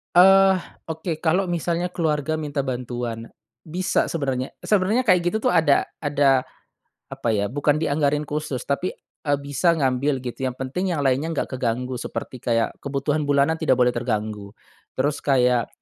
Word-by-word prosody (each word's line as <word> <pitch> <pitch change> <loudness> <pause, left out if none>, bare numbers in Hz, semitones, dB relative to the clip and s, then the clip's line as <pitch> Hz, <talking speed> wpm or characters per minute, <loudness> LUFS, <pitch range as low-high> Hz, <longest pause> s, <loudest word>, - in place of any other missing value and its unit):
Eee, 190 +1 +7 0.3
oke, 160 0 -4
kalo 180 +4 +2
misalnya 175 0 -1
keluarga 155 -3 -1
minta 150 -2 -3
bantuan, 120 -3 -4 0.3
bisa 180 +4 -1
sebenarnya 135 -5 -2
sebenarnya 210 +5 +1
kayak 175 -2 +4
gitu 220 - -1
tuh - - +2
ada 160 -4 +4 0.2
ada 140 -3 +3 0.7
apa - - -5
ya 100 0 -1
bukan 145 +2 +2
dianggarin 150 -1 +1
khusus 150 -3 -4
tapi, 145 +6 -2 0.3
eee, 145 - +4
bisa 145 +5 +2
ngambil 135 -1 0
gitu 130 +1 -3
yang 125 - -4
penting 175 +8 -2
yang 145 - -1
lainnya 135 +3 +1
nggak - - -2
keganggu 125 +1 -2
seperti 130 - -6
kayak 115 -1 +1
kebutuhan 145 +2 -1
bulanan 145 +3 +2
tidak 130 - +3
boleh 125 0 +3
terganggu, 110 -4 -3 0.4
terus 145 +3 0
kayak, 125 -3 +2
145 Hz, 150 wpm, -23 LUFS, 125-165 Hz, 0.7 s, Eee